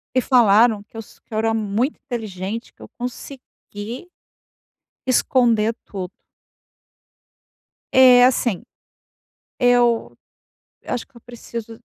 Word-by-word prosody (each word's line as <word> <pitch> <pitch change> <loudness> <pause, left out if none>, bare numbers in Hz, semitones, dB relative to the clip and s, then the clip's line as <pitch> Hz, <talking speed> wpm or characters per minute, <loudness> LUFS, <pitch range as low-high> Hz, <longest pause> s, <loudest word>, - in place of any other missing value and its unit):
e 255 - +4
falaram 225 -3 +4
que 215 - -27
eu 225 - -5
so - - -19
que - - -15
eu 215 - -2
era 225 0 +1
muito 220 +6 -1
inteligente 220 -3 -6
que - - -23
eu - - -11
consegui 245 +1 -8 1.0
esconder 235 -3 +2
tudo. 185 -3 -6 1.8
Eh, 255 -1 +7
assim, 240 -5 +1 1.0
eu 245 -2 +2 0.7
eu - - -5
acho 245 - -4
que 275 - -38
eu 235 - -15
preciso 230 -1 -9
235 Hz, 115 wpm, -21 LUFS, 215-245 Hz, 1.8 s, Eh